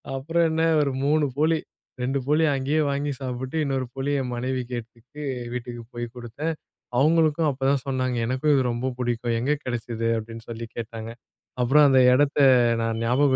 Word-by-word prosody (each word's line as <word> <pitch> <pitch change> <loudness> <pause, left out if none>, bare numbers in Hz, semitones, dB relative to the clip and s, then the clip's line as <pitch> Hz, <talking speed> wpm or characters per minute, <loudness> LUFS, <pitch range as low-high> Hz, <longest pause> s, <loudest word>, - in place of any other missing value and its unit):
அப்புறம் 165 +5 +1
என்ன 160 +1 +1 0.2
ஒரு 140 - +1
3 150 +1 +3
போளி, 160 +2 +3 0.4
2 135 +2 0
போளி 150 +2 +3
அங்கேயே 140 +4 +1
வாங்கி 140 +1 -1
சாப்பிட்டு, 130 +2 -4
இன்னொரு 135 -2 -1
போளி 135 +2 -2
என் 125 -1 -4
மனைவிக்கு 125 0 -3
எடுத்துட்டு, 120 +5 -13 0.3
வீட்டுக்கு 120 -1 -6
போய் 120 0 -3
குடுத்தேன். 125 +7 -4 0.4
அவங்களுக்கும் 155 +2 +3
அப்போதான் 135 0 0
சொன்னாங்க, 130 -2 -1
"எனக்கும் 130 +5 +1
இது 135 - +3
ரொம்ப 125 +2 -2
புடிக்கும். 120 -1 -1
எங்கே 140 +5 +1
கிடைச்சது?" 115 -2 -3
அப்டின்னு 115 +1 -8
சொல்லி 115 0 -5
கேட்டாங்க. 115 -1 -6 0.5
அப்புறம் 145 +5 +5
அந்த 130 -1 +5
இடத்த 145 +2 +2 0.4
நான் 115 0 -1
ஞாபகம் 130 +3 +3
130 Hz, 155 wpm, -24 LUFS, 120-145 Hz, 0.5 s, அப்புறம்